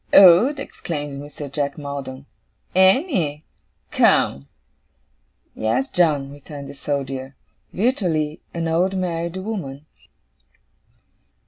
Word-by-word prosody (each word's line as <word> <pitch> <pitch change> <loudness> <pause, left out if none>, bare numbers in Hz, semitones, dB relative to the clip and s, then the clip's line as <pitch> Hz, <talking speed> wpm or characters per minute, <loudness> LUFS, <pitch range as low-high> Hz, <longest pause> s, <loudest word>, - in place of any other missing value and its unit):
'Old?' 195 - +8
exclaimed 145 - -5
Mr. 145 0 -8
Jack 140 0 -2
Maldon. 140 -2 -6 0.5
'Annie? 190 - +3 0.5
Come!' 70 +1 +3 1.1
'Yes, 110 - -1
John,' 150 -6 +2
returned 145 0 -9
the - - -8
Soldier. 135 -1 -4 0.4
'Virtually, 175 - 0
an 165 -1 -2
old 180 +4 +1
married 170 -1 -2
woman. 185 -9 -5
150 Hz, 90 wpm, -22 LUFS, 140-185 Hz, 1.1 s, Old